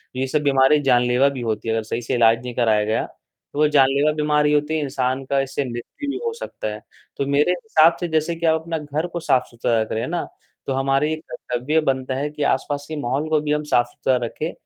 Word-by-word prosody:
ये 130 +1 -1
सब 150 +3 0
बीमारी 140 +1 +4
जानलेवा 125 0 +3
भी 135 -3 -6
होती 110 -1 -3
है 110 - +1
अगर 110 - -1
सही 115 +2 -4
से 125 +2 -3
इलाज 115 -1 +4
नहीं 125 -1 -5
कराया 110 -3 +2
गया, 110 +1 0 0.5
तो 145 - -4
वो 150 - +5
जानलेवा 140 +1 +3
बीमारी 150 -1 +2
होती 150 +1 +1
है, - - 0
इंसान 130 -1 -1
का 140 +1 +1
इससे 135 +1 -3
मृत्यु 125 - -6
भी 285 - -2
हो 460 - -1
सकता 450 - -6
है। 105 - -9 0.4
तो 140 - -1
मेरे 145 +5 +3
हिसाब 170 -3 +3
से 175 - -2
जैसे 160 +1 0
कि 165 0 -4
आप 160 0 +3
अपना 165 0 -3
घर 150 +2 -3
को 175 0 -5
साफ-सुथरा 120 -6 0
रख 110 - -4
रहें 110 - -1
है 120 - -3
ना, 175 -1 -1 0.4
तो 135 - 0
हमारी 135 +3 +1
कर्तव्य 155 -2 -2
बनता 130 -2 -1
है 145 +3 -2
कि 150 0 -4
आसपास 145 +1 -1
के 155 - -5
माहौल 140 +5 -2
को 155 -1 +3
भी 150 - -2
हम 150 0 0
साफ-सुथरा 120 +2 +2
रखें 155 +8 -4
140 Hz, 235 wpm, -22 LUFS, 125-155 Hz, 0.5 s, वो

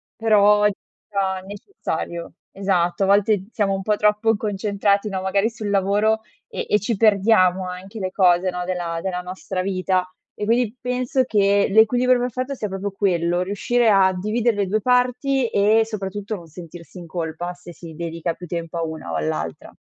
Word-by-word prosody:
però 210 -2 +4
sia 195 -1 -4
necessario. 200 - -6 0.2
Esatto, 180 -2 +1
a - - +2
volte 200 0 +2
siamo 205 -4 0
un 195 - -2
po' 210 +2 0
troppo 210 +2 +2
concentrati 205 0 0
no, 190 -2 -3
magari 195 +3 +1
sul 215 -3 -6
lavoro 205 +3 +2 0.3
e - - -5
e 210 - +3
ci 225 +2 -1
perdiamo 195 -3 +3
anche 185 +4 -8
le 185 -2 -3
cose 180 -1 +3
no, 180 0 -4
della 175 -2 -3
della 180 -1 -3
nostra 185 +1 -5
vita; 185 -1 0 0.3
e 210 - -4
quindi 230 0 +1
penso 250 +1 0
che 200 -4 +2
l'equilibrio 245 +4 +4
perfetto 255 +2 -3
sia 225 -6 -4
proprio 195 +1 -4
quello: 175 -3 0
riuscire 220 +5 +1
a 195 -2 +4
dividere 215 +4 0
le 200 -1 0
2 215 +3 0
parti 250 +2 +2
e 210 +3 +3
soprattutto 205 -1 -5
non 170 -4 -11
sentirsi 170 +2 -11
in 175 - -10
colpa 170 +1 -4
se 175 -1 -13
si 165 -2 -11
dedica 165 0 -3
più 180 - -10
tempo 170 0 -5
a 165 - -1
una 160 - -6
o - - -2
all'altra. 80 +1 -4
195 Hz, 170 wpm, -22 LUFS, 180-215 Hz, 0.3 s, però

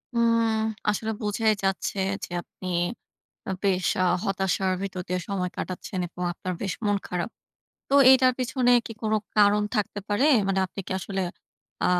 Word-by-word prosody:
উম 230 -1 +3 0.4
আসলে 220 +2 -1
বোঝাই 215 +1 +2
যাচ্ছে 195 +1 -1 0.3
যে - - -5
আপনি 185 - -11 0.8
আ - - -1
বেশ 190 -2 +1 0.2
আ - - +4 0.2
হতাশার 190 -1 0
ভিতর 190 -2 -4
দিয়ে 180 0 -1
সময় 185 -2 -1
কাটাচ্ছেন 185 +1 -5
এবং 180 +1 -8
আপনার 185 +1 -4
বেশ 195 -2 -1
মন 205 0 +3
খারাপ। 180 +4 -2 0.6
তো 275 - +1 0.2
এইটার 255 -1 +6
পিছনে 255 0 +1 0.2
কি 225 - -6
কোনো 220 0 +2 0.2
কারণ 210 0 +5
থাকতে 210 -1 -1
পারে? 210 +7 +2 0.2
মানে 195 0 +1
আপনি 190 - -7
কি - - -3
আসলে 195 +1 -3 0.6
আ - - +3
200 Hz, 160 wpm, -26 LUFS, 185-220 Hz, 0.8 s, এইটার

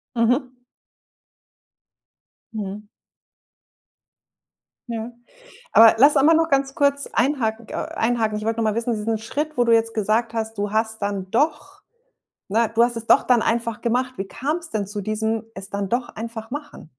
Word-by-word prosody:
Mhm. 250 +2 +1 1.9
Mhm. 210 -1 -6 2.0
Ja. 230 +1 -4 0.6
Aber 225 -1 +8
lass 285 +5 +6
einmal 305 +4 +5
nur 325 0 +3
ganz 275 -2 0
kurz 280 -1 +1
einhaken, 235 -4 0
k - - -4
einhaken. 225 -2 0
Ich 215 - -5
wollte 225 0 -1
noch - - +1
mal 215 - +1
wissen, 230 +1 -1
diesen 220 +1 -1
Schritt, 295 +7 -4
wo 245 - +4
du 235 - +2
jetzt 225 0 +2
gesagt 220 +2 0
hast, 220 -1 -3
du 205 0 -2
hast 220 0 -1
dann 195 -2 -3
doch, 320 - -1 0.7
ne, 225 +2 +1
du 230 - +3
hast 240 0 +3
es 230 0 -6
doch - - +5
dann 245 -3 +3
einfach 230 -1 -1
gemacht. 250 +2 0
Wie 195 - -3
kam's 305 - -4
denn 205 -3 -2
zu 205 0 -5
diesem 220 +2 -1
„es 195 +1 -9
dann 200 -1 -3
doch 240 +2 -1
einfach 225 0 -7
machen“? 290 +2 -8
230 Hz, 165 wpm, -22 LUFS, 220-255 Hz, 2.0 s, Aber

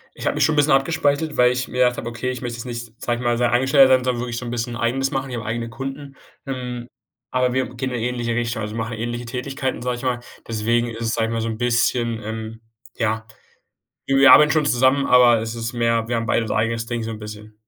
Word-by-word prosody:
Ich - - -7
habe - - +1
mich - - +3
schon 160 - +2
'n - - -3
bisschen 145 +1 +4
abgespaltet, 145 +2 +1
weil 125 0 +5
ich 125 0 -3
mir 125 - -6
gedacht 125 -1 +3
habe, 115 - -5
okay, 120 +2 -3
ich 125 - -5
möchte 120 -1 -4
jetzt 115 - -6
nicht, 120 -2 -6
sage 120 -1 -1
ich - - -6
mal, 120 0 +2
sein 120 0 +2
Angestellter 130 +2 +5
sein, 130 -1 +1
sondern 125 -2 0
wirklich 120 -1 -4
so 125 - -6
'n - - -4
bisschen 120 0 -3
eigenes 130 +3 0
machen. 135 0 -3
Ich 120 - -4
habe 115 - -5
eigene 115 +1 -3
Kunden. 135 +3 -7 0.3
Ähm, 125 -2 -5 0.4
aber 125 -1 +1
wir 130 0 0
gehen 130 +1 -3
in 125 - -3
'ne 115 - -1
ähnliche 120 -1 -2
Richtung. 120 -1 -2
Also, 105 +1 -5
wir - - -4
machen 115 0 -3
ähnliche 120 +2 -4
Tätigkeiten, 130 +1 -3
sage 125 0 -1
ich - - -9
mal. 125 -2 -1 0.3
Deswegen 115 +2 0
ist 115 -1 -7
es, 115 0 0
sage 115 -1 +1
ich - - -3
mal 115 - -1
so 115 - -2
'n 110 -1 -4
bisschen, 120 -1 +1
ähm 110 +1 -6 0.4
ja, 110 -1 -1 0.8
wir 135 0 +2
wir 140 +1 +8
arbeiten 150 0 +7
schon 155 -2 +2
zusammen, 130 +2 +3
aber 120 -2 +6
es 115 +1 -4
ist 115 0 -4
mehr 115 -1 +1
wir 120 - -1
haben 115 - -2
beide 115 - +1
so - - -1
unser - - 0
eigenes 115 0 -1
Ding 120 -1 -3
so 115 - -4
'n 110 - -7
bisschen. 105 0 -9
120 Hz, 270 wpm, -22 LUFS, 115-130 Hz, 0.8 s, wir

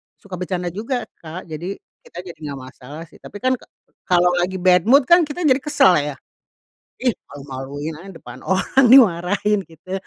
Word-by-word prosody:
suka 185 -3 -10
bercanda 180 -1 -3
juga 235 +6 -3 0.2
Kak 165 +3 -8
jadi 175 +6 -5 0.3
kita - - -15
jadi 170 -3 -11
gak 140 -2 -6
masalah 140 +5 -11
sih. - - -18
Tapi - - -14
kan 260 0 +3
ka - - -19 0.4
kalo 180 0 +3
lagi 180 +2 -1
bad 180 -1 +3
mood 275 +3 +6
kan 340 +3 +4
kita 340 +4 -5
jadi 270 -2 +3
kesel 290 -7 +3
ya? 145 -1 -4 0.9
"Ih 250 -3 +2 0.2
malu-maluin 140 +2 -7
aja 175 +5 -12
depan 165 - -12
orang 190 - +2
dimarahin 205 -3 +4
gitu," 185 +4 -7
185 Hz, 175 wpm, -20 LUFS, 160-240 Hz, 0.9 s, mood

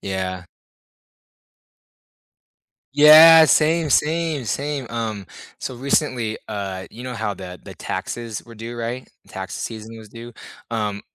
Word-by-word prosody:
Yeah. 95 -1 -4 2.5
Yeah, 160 +2 +9
same, 160 +1 +2
same, 155 0 0
same, 140 +3 -3
um, 110 -3 -4 0.4
so, 130 - -5
recently, 125 -4 -1
uh, 95 -2 -5
you 120 +2 -10
know 125 -1 -5
how 110 -3 -3
the 90 -1 -10
the - - -11
taxes 115 -3 -5
were 115 -2 -14
due, 115 +2 -8
right? 120 +2 -5 0.2
Tax - - -7
season 110 0 -7
was 110 -1 -12
due, 115 +2 -11 0.4
um, 105 -3 -2
115 Hz, 125 wpm, -21 LUFS, 105-145 Hz, 2.5 s, Yeah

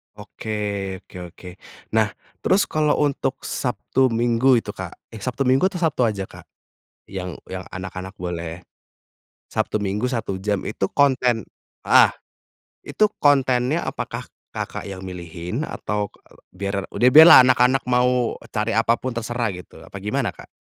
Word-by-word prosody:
Oke 105 +1 -7 0.5
oke - - -20
oke. 90 +1 -12 0.4
Nah, 110 -1 +3 0.3
terus 195 +2 +3
kalau 150 -1 +1
untuk 145 -2 0
Sabtu, 130 0 0
Minggu 120 +2 +3
itu, 105 - -5
Kak. 95 -3 -8 0.2
Eh, 110 - -9
Sabtu, 125 +5 -2
Minggu 135 +7 +3
atau 195 - -8
Sabtu 140 -6 +2
aja, 100 -3 -2
Kak? - - -13 0.6
Yang 90 -2 -6
yang 95 0 -6
anak-anak 95 +1 -6
boleh 85 -2 -5 0.9
Sabtu 105 - -1
Minggu 100 +4 -1
1 115 -6 -2
jam 100 0 -1
itu 100 -2 -2
konten 130 -5 +3 0.5
heeh. - - +7 0.7
Itu 215 - +1 0.2
kontennya 135 +1 +3
apakah - - -5 0.3
Kakak - - -5
yang 95 -1 -7
milihin? 90 - -5
Atau 105 -9 -3
k - - -26
eee, - - -21 0.2
biar 100 +1 -2
udah 125 +1 +3
biarlah 160 +3 +11
anak-anak 125 +1 +3
mau 125 -1 +2 0.2
cari 105 +1 -1
apa 115 +1 +3
pun 130 -1 -4
terserah 115 -2 -2
gitu, 90 0 -11
apa 100 - -10
gimana, 105 +2 -1
Kak? - - -14
115 Hz, 150 wpm, -22 LUFS, 95-130 Hz, 0.9 s, biarlah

